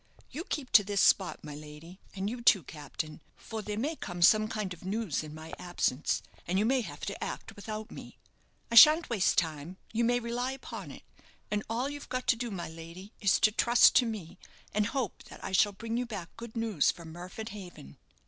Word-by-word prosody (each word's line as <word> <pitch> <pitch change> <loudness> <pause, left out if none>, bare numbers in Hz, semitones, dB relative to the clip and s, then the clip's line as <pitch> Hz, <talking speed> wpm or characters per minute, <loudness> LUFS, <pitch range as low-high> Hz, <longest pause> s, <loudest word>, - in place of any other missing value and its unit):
You 315 +7 -5
keep 270 -4 -4
to 205 - +8
this 200 0 -1
spot, 190 -1 +3
my 150 - -7
lady, 150 +5 -11 0.2
and 195 0 -2
you, 240 +3 -4
too, 205 -6 +5
captain; 155 +2 -7
for 220 -1 -6
there 210 0 -4
may 290 +8 -1
come 175 - -3
some 215 +4 +6
kind 215 -4 -3
of 180 - -14
news 200 -3 -1
in 155 - -8
my 160 +1 -10
absence, 175 -5 -1 0.2
and 180 +2 0
you 210 - +3
may 260 +2 +3
have 150 -9 -7
to 200 - -4
act - - -6
without 215 +1 -6
me. - - -10 0.5
I - - -2
shan't 305 +6 +9
waste 205 -5 +2
time, 160 +1 -1 0.2
you 230 +1 +1
may 245 +1 +3
rely 245 +2 -2
upon 265 - -8
it; - - -11 0.5
and 210 0 +1
all 240 +4 0
you've 290 0 -7
got 255 0 -2
to - - +6
do, 240 +1 -4
my 190 -5 -5
lady, 165 +5 -10
is 200 -3 +4
to 215 - +5
trust 235 +2 +6
to 245 - +4
me, 205 -8 -6 0.3
and 210 0 +2
hope 250 -3 -3
that - - -12
I - - -4
shall 205 +2 +4
bring 225 +3 -4
you 245 0 -1
back 195 -7 -7
good 230 0 -9
news 220 -9 +2
from 165 -2 -5
Murford 185 +6 -7
Haven." 180 - -10
205 Hz, 215 wpm, -30 LUFS, 175-235 Hz, 0.5 s, shan't